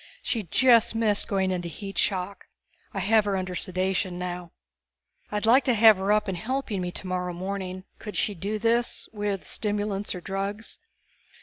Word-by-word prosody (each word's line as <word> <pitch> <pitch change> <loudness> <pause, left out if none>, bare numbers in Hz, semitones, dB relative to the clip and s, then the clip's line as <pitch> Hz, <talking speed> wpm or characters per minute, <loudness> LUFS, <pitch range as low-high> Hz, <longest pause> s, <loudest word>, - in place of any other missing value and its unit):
She 230 - -1
just 235 +4 +4
missed 215 -2 +2
going 190 -2 +1
into 175 -1 -2
heat 195 +5 -8
shock. 195 0 -1 0.4
I 195 - -3
have 215 +3 +4
her 200 -1 0
under 185 -1 -3
sedation 185 0 -1
now." 180 -1 -5 0.8
"I'd 210 +1 -1
like 250 +4 +6
to 250 - +3
have 220 -1 +7
her 195 +2 0
up 210 0 +3
and 190 - -1
helping 230 -2 -2
me 180 0 -3
tomorrow 180 -1 -3
morning. 185 0 -4 0.2
Could 210 - -7
she 210 - +1
do 200 +4 -3
this 230 +2 +1
with 205 -2 -3
stimulants 205 -2 -2
or - - -5
drugs?" 195 +3 -4
200 Hz, 170 wpm, -26 LUFS, 185-215 Hz, 0.8 s, have